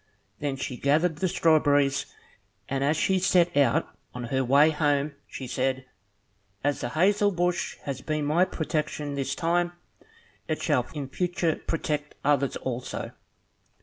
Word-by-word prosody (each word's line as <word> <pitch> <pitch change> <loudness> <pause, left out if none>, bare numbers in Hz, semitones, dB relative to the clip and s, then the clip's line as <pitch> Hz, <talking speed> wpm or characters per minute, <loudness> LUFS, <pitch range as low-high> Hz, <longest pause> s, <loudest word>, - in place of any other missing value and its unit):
Then 145 -2 -2
she 130 -1 -5
gathered 155 +5 +2
the 185 - 0
strawberries, 145 -5 +3 0.6
and 135 0 -1
as 150 +3 +2
she 190 +4 +2
set 175 -2 +3
out 140 -5 +3 0.3
on 125 - -5
her 130 0 +2
way 140 +5 +5
home 145 -1 +1
she 130 - -7
said, 130 +1 -1 0.8
"As 145 0 0
the 120 - -2
hazel 205 - +3
bush 175 -1 -1
has 135 -2 -4
been 155 0 -2
my 165 +5 +3
protection 150 -3 -3
this 140 -1 -2
time, 175 +1 +1 0.7
it 155 - -1
shall 135 -7 +1
in 145 -2 -4
future 175 +2 -1
protect 150 -2 -2
others 140 -2 +2
also." 125 -1 -4
150 Hz, 145 wpm, -27 LUFS, 140-170 Hz, 0.8 s, way